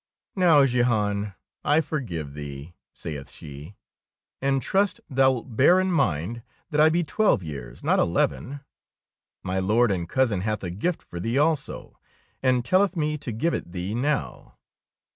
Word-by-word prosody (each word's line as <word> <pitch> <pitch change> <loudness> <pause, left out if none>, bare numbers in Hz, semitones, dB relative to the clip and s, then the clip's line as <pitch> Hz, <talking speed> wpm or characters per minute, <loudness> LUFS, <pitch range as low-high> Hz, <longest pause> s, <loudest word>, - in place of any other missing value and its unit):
Now, 165 -7 +5
Jehan, 105 -5 0 0.3
I 150 +2 +4
forgive 90 - -4
thee," 70 +2 -8 0.2
saith 75 -4 -7
she, 75 +6 -11 0.7
'^and 135 0 +2
trust 195 - +1
thou 130 0 +4
It 115 0 -10
bear 175 +10 +6
in 185 0 +1
mind 115 - 0 0.3
that 150 0 +3
I 155 - +7
be 170 +2 +1
twelve 200 - +2
years, 65 -6 -8
not - - +3
eleven. 85 - 0 0.8
My 95 0 -1
Lord 110 +4 +3
and 85 -3 -2
cousin 120 -8 +1
hath 105 0 -2
a 90 - -3
gift 160 - -2
for 85 - -8
thee 115 +8 -1
also, 150 -1 -1 0.4
and 125 -2 +2
telleth 190 +5 +3
me 150 -1 -1
to 135 -4 -5
give 140 +10 0
it 85 - -4
thee 90 +3 -3
now. 140 +5 -2
120 Hz, 155 wpm, -25 LUFS, 90-150 Hz, 0.8 s, I